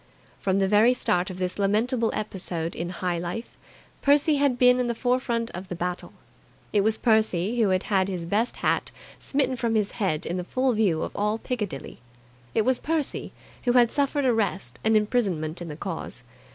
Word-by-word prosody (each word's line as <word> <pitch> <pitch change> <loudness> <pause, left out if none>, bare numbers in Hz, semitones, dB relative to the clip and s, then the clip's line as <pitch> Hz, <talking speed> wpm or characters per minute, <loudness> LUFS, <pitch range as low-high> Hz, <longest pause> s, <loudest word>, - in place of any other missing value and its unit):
From 190 -1 +1
the 195 -1 +2
very 215 +5 +5
start 180 -6 0
of 185 - -7
this 185 +1 -3
lamentable 225 +4 +1
episode 180 -5 -3
in 170 +1 -4
high 180 -1 -2
life, 175 +7 -5 0.5
Percy 290 +1 +4
had 280 -3 +2
been 250 0 +5
in 250 - +1
the 235 - -1
forefront 245 -2 0
of 185 +2 -7
the 180 - -5
battle. 180 +1 -4 0.6
It 205 - +4
was 220 +2 +2
Percy 220 -1 +2
who 210 - +3
had 185 0 +1
had 190 -2 +1
his 180 -3 -4
best 210 +7 0
hat - - +1 0.3
smitten 270 -2 0
from 235 -2 -1
his 210 -2 +1
head 185 -9 -1
in 175 - -2
the 180 - -2
full 255 +7 0
view 195 -8 +1
of - - -6
all 210 +2 0
Piccadilly. 210 - -5 0.6
It 220 - +3
was 255 +2 +2
Percy 315 -2 -2 0.3
who 245 - +3
had 240 -2 +5
suffered 285 0 +1
arrest 195 - 0
and 220 0 +4
imprisonment 190 -8 0
in 175 - -5
the 150 - -6
cause. 165 -9 -6
210 Hz, 190 wpm, -26 LUFS, 180-245 Hz, 0.6 s, very